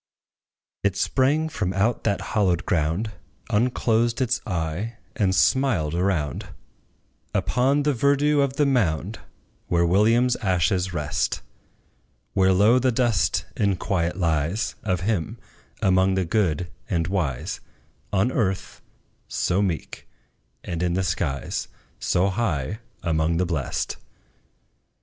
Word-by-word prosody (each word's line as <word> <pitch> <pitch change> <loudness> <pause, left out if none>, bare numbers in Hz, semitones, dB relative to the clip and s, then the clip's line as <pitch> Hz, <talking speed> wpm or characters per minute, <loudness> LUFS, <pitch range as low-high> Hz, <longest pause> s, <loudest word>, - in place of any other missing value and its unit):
It 100 -1 +1
sprang 135 +9 +2
from 105 - -2
out 110 +5 0
that 100 -3 +1
hallowed 95 -6 +2
ground, 85 +7 0 0.4
Unclosed 115 +1 +1
its 125 -1 +1
eye, 90 +7 -3 0.2
and 95 -3 +1
smiled 90 - +2
around, 85 -7 -1 0.9
Upon 135 +4 +2
the 145 0 +2
verdure 140 +3 +3
of 135 -1 -1
the 145 - +3
mound, 105 - 0 0.5
Where 85 0 +2
WILLIAM's 115 +7 +3
ashes 95 -1 +1
rest; 75 -3 -1 0.9
Where 95 -1 +4
low 105 +7 +5
the 130 0 +2
dust 120 -5 +1
in 100 -2 +1
quiet 90 -1 -1
lies 85 +3 0
Of 90 -4 -1
him, 90 -5 -1 0.5
among 95 0 +3
the 95 -1 +1
good 90 -3 0 0.2
and 85 -1 +1
wise 80 -9 -2 0.5
On 100 +5 +2
earth, 95 -7 -2 0.5
so 90 +2 0
meek, 90 -6 -3 0.6
and 85 -1 -4
in 90 -1 +1
the 95 - +1
skies 85 -6 -2 0.3
So 95 +3 +2
high 95 - -1 0.2
among 80 0 +1
the 90 - +1
blest. 80 -7 -2
95 Hz, 120 wpm, -24 LUFS, 85-115 Hz, 0.9 s, low